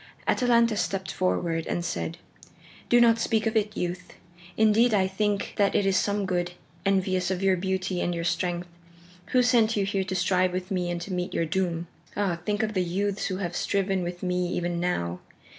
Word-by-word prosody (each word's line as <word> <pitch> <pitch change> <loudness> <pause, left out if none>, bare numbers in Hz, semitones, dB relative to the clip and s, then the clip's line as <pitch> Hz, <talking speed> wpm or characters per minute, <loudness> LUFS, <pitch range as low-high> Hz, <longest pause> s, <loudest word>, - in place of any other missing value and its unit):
Atalanta 235 -3 +3
stepped 195 -2 -2
forward 170 -3 -1
and 175 - -2
said: 85 - -3 0.7
"Do 240 - +6
not 230 -1 +5
speak 220 -1 +1
of 225 0 0
it, 210 -1 0
youth. 180 0 -4 0.4
Indeed 220 +1 +4
I 190 -2 +3
think 200 +1 -1
that 200 -1 +2
it 200 - +3
is 195 -1 +2
some 200 +1 +1
god, 175 -1 -1 0.3
envious 185 -2 +1
of 190 0 -2
your 190 -1 +4
beauty 185 0 -2
and 175 - -1
your 170 - -3
strength, 175 +1 -1 0.6
who 250 -1 +3
sent 225 -2 +3
you 200 - +2
here 195 -1 0
to 190 0 -3
strive 185 0 +2
with 185 +1 -4
me 180 -2 0
and 175 0 -2
to 185 +2 -5
meet 180 0 -3
your 165 - +1
doom. 170 0 -1 0.3
Ah, 190 -5 0
think 205 +2 0
of 215 0 -1
the 185 - +1
youths 195 +3 -1
who 185 - -2
have 175 -3 -3
striven 195 0 0
with 175 +1 -5
me 180 -1 0
even 175 0 -1
now! 90 - -1
185 Hz, 195 wpm, -26 LUFS, 175-205 Hz, 0.7 s, Do